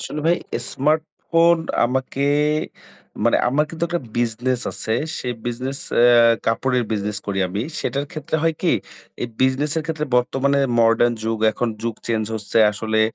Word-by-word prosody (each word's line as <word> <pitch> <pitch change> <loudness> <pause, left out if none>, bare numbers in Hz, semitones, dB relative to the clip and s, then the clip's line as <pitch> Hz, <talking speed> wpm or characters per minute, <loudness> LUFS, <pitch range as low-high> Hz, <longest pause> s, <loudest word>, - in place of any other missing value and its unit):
আসলে 150 - -5
ভাই, 170 +1 +4 0.4
স্মার্টফোন 160 +3 +2 0.3
আমাকে 130 +2 -1 1.0
মানে, 120 - +4
আমার 150 +4 +2
কিন্তু 165 0 -2
একটা 175 0 -1 0.2
বিজনেস 120 +2 0
আছে। 110 - -4 0.3
সেই 125 -1 -3
বিজনেস 130 +3 -3 0.2
এ - - +7 0.4
কাপড়ের 125 +2 +1
বিজনেস 105 -1 -2
করি 100 -1 -2
আমি। 100 +4 -3 0.2
সেটার 140 +3 -2
ক্ষেত্রে 155 0 -3
হয় 165 -1 +2
কি, 180 - +3 0.5
এই 120 - -2
বিজনেস 130 +3 +2
এর - - -2
ক্ষেত্রে, 160 -2 -2
বর্তমানে 135 +3 +1 0.2
মডার্ন 115 +1 +4
যুগ 115 0 -1
এখন, 120 - -1
যুগ 115 -1 -2
চেঞ্জ 110 -2 0
হচ্ছে। 105 +1 -1
আসলে, 110 +1 -1
125 Hz, 150 wpm, -21 LUFS, 115-150 Hz, 1.0 s, এ